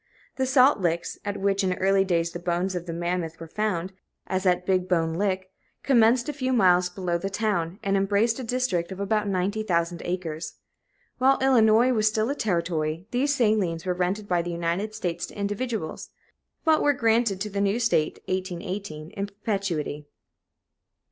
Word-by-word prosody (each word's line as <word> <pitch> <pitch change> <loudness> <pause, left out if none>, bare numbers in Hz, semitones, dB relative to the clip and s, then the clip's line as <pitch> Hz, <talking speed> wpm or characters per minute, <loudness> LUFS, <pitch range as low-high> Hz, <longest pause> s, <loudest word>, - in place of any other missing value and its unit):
The 260 -1 0
salt 260 -1 +5
licks 170 -2 -1
at 205 0 -3
which 195 0 +1
in 185 -1 +1
early 195 +1 +3
days 170 -3 0
the 175 - -6
bones 175 +2 -1
of 175 -1 -5
the - - -3
mammoth 170 -1 -3
were 165 - -7
found, 190 -1 -2 0.3
as 185 0 -1
at 180 0 +2
Big 185 -1 +1
Bone 165 -2 +1
Lick 190 +1 -1 0.3
commenced 240 -2 +4
a 300 - -2
few 260 -2 -1
miles 180 -5 +4
below 175 -1 -2
the 195 - -3
town, 195 -4 -1
and 195 0 +1
embraced 205 +5 +2
a - - -4
district 225 -8 -1
of 190 - -7
about 210 +1 0
ninety 195 +2 0
thousand 170 -4 -1
acres. 170 -3 -4 0.6
While 265 +1 +4
Illinois 245 -2 +4
was 215 -2 +2
still 215 +3 +1
a - - -2
Territory, 170 - -1
these 280 +4 +1
salines 205 -9 +1
were 180 - +1
rented 185 +4 -2
by 175 -2 +2
the 175 - -5
United 170 +5 -2
States 175 -5 -3
to - - -13
individuals, 205 -3 -3 0.6
but 315 -1 +4
were 290 - +4
granted 230 -5 +2
to 210 0 -3
the 200 0 -1
new 200 +3 +1
State 230 -10 +1
(1818) 185 -3 -4
in 200 -2 -4
perpetuity. 195 -8 -3
195 Hz, 175 wpm, -25 LUFS, 175-220 Hz, 0.6 s, salt